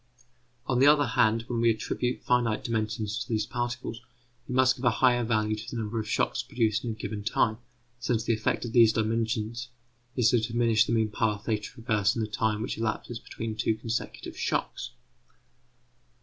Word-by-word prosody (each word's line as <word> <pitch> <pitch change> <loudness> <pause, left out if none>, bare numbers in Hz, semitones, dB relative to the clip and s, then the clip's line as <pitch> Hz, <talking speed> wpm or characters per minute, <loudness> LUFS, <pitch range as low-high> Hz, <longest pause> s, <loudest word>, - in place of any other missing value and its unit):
On 125 -2 +1
the 135 - +6
other 145 -1 +6
hand, 115 -2 +2
when 115 0 -2
we 115 - +5
attribute 125 +2 -1
finite 120 -3 +1
dimensions 110 -1 -2
to - - -6
these 110 -2 0
particles, 120 0 -4 0.5
we 125 - -3
must 130 0 +5
give 125 - -10
a - - +7
higher 120 +1 +3
value 110 -2 +1
to 105 - -8
the 120 - -5
number 110 +1 -2
of 105 -1 -4
shocks - - +1
produced 115 -2 0
in 120 - -3
a - - -9
given 105 -1 -5
time, 110 +1 +1 0.4
since 120 -2 0
the 120 - +1
effect 110 +2 -1
of 115 - -5
these 115 -3 +6
dimensions 115 +1 -1 0.5
is 120 -4 +4
to 120 - +4
diminish 115 -1 +2
the - - -1
mean 110 -2 +1
path 105 -1 0
they 110 -1 +1
traverse 105 -1 -1
in 115 - -1
the - - -2
time 110 0 0
which 115 - -4
elapses 115 +1 -2
between 110 -1 -6
two 110 0 +1
consecutive 115 +1 -4
shocks. - - -2
115 Hz, 190 wpm, -28 LUFS, 110-120 Hz, 0.5 s, a